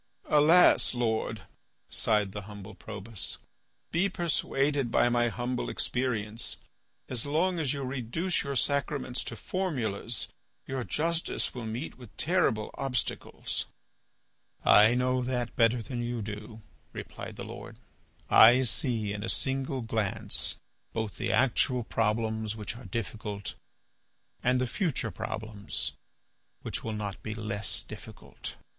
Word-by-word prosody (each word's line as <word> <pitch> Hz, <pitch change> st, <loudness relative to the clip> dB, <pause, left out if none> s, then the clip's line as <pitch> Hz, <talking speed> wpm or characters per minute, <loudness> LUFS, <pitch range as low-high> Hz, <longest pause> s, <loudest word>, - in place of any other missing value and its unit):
"Alas! 155 Hz, -1 st, +6 dB
Lord," 110 Hz, -3 st, 0 dB, 0.4 s
sighed 105 Hz, -3 st, +3 dB
the 105 Hz, -, -5 dB
humble 105 Hz, 0 st, -9 dB
Probus. 105 Hz, +1 st, -4 dB, 0.5 s
"Be 180 Hz, +4 st, +2 dB
persuaded 145 Hz, -6 st, +1 dB
by 120 Hz, -, +4 dB
my 120 Hz, 0 st, +3 dB
humble 120 Hz, +1 st, -2 dB
experience; 115 Hz, -3 st, 0 dB, 0.5 s
as 125 Hz, -3 st, +1 dB
long 170 Hz, +5 st, +1 dB
as 145 Hz, -5 st, +1 dB
you 140 Hz, -1 st, -2 dB
reduce 130 Hz, +8 st, -1 dB
your 140 Hz, -1 st, -3 dB
sacraments 140 Hz, -1 st, 0 dB
to 120 Hz, -, -5 dB
formulas 120 Hz, -, -1 dB, 0.4 s
your 130 Hz, -1 st, -2 dB
justice 165 Hz, -, 0 dB
will 120 Hz, -3 st, -5 dB
meet 120 Hz, +6 st, -5 dB
with 120 Hz, -4 st, -13 dB
terrible 160 Hz, -12 st, +2 dB
obstacles." 135 Hz, -3 st, -2 dB, 1.0 s
"I 110 Hz, +3 st, +8 dB
know 130 Hz, +1 st, +2 dB
that 125 Hz, -2 st, -2 dB
better 115 Hz, 0 st, +4 dB
than 120 Hz, +1 st, -4 dB
you 120 Hz, -2 st, -2 dB
do," 105 Hz, +1 st, -7 dB, 0.3 s
replied -, -, -7 dB
the -, -, -6 dB
Lord. -, -, -9 dB, 0.5 s
"I 120 Hz, +4 st, +8 dB
see 115 Hz, -4 st, 0 dB
in 105 Hz, 0 st, -4 dB
a -, -, -2 dB
single 135 Hz, -1 st, 0 dB
glance 110 Hz, -4 st, 0 dB, 0.4 s
both 110 Hz, -3 st, -2 dB
the -, -, 0 dB
actual 125 Hz, -1 st, +3 dB
problems 110 Hz, -1 st, 0 dB
which 110 Hz, +1 st, -4 dB
are 125 Hz, -, -10 dB
difficult, 105 Hz, -3 st, -4 dB, 0.9 s
and 125 Hz, 0 st, +3 dB
the 130 Hz, -, +2 dB
future 125 Hz, -, 0 dB
problems 110 Hz, -1 st, -4 dB, 0.7 s
which -, -, -2 dB
will 110 Hz, -, -2 dB
not 105 Hz, -2 st, -4 dB
be 110 Hz, 0 st, -4 dB
less 105 Hz, -2 st, 0 dB
difficult. -, -, -9 dB
120 Hz, 125 wpm, -30 LUFS, 110-135 Hz, 1.0 s, I